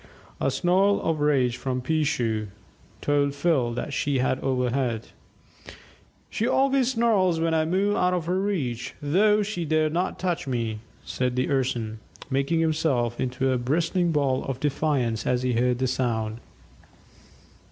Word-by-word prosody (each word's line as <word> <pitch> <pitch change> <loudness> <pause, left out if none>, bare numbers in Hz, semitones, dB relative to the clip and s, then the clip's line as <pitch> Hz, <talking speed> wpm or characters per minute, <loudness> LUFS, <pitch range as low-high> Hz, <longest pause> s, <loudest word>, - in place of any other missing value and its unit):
A - - +1
snarl 185 +8 +2
of 160 -2 0
rage 135 -5 +2
from 130 -1 -2
"Peeshoo" 125 -7 0 0.5
told 140 -1 +1
Phil 140 -6 +1
that 140 +3 -4
she 140 -1 0
had 130 +1 +1
overheard. 125 -3 -1 1.2
"She 225 - -2
always 265 -1 +2
snarls 205 -8 +2
when 165 0 +1
I 160 -1 +2
move 195 +5 +1
out 180 0 +2
of 175 -3 -2
her 180 +2 0
reach, 150 - -2
though 210 +8 +3
she 195 -4 -3
dare 155 0 +1
not 175 +3 -1
touch 175 -6 -2
me," 115 -4 -2 0.3
said 125 -1 -2
the 130 +3 0
Urson, 120 -5 -1 0.3
making 140 +5 +1
himself 145 -7 0
into 130 +1 0
a 130 - +1
bristling 165 +7 +1
ball 140 -4 +1
of 135 -2 -4
defiance 135 -6 0
as 125 0 +1
he 125 -1 +1
heard 125 +1 +1
the 130 - 0
sound. 115 -3 -1
140 Hz, 150 wpm, -25 LUFS, 125-170 Hz, 1.2 s, though